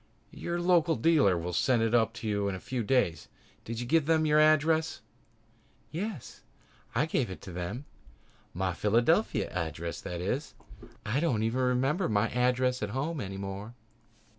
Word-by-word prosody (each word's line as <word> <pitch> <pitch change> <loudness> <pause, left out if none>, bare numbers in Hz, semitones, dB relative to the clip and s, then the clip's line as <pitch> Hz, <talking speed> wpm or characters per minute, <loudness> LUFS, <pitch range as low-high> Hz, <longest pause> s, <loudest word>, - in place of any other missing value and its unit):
"Your 170 0 -4
local 175 -2 +3
dealer 125 - +3
will 90 +1 -4
send 120 +5 +2
it 115 0 +2
to 115 - -5
you 100 -1 0
in 95 - -3
a - - -6
few 125 +5 -3
days. 115 -7 +1 0.4
Did 115 0 -5
you 120 - -3
give 155 +3 +2
them 160 -1 +3
your 150 0 +4
address?" 155 -2 +3 0.9
"Yes, 185 - -5 0.5
I 130 +6 +3
gave 135 -7 0
it 95 - -7
to 95 - -9
them. 90 +10 -5 0.7
My 95 0 -1
Philadelphia 120 - +2
address, 85 -1 -4
that 90 - -5
is. 125 - -3 0.5
I 110 +7 0
don't 130 -10 +1
even 115 +4 0
remember 130 +7 +1
my 105 +1 +2
address 125 +1 +1
at 105 - -2
home 140 +6 -2
any 95 0 -5
more." 100 +4 -6
120 Hz, 165 wpm, -29 LUFS, 100-155 Hz, 0.9 s, your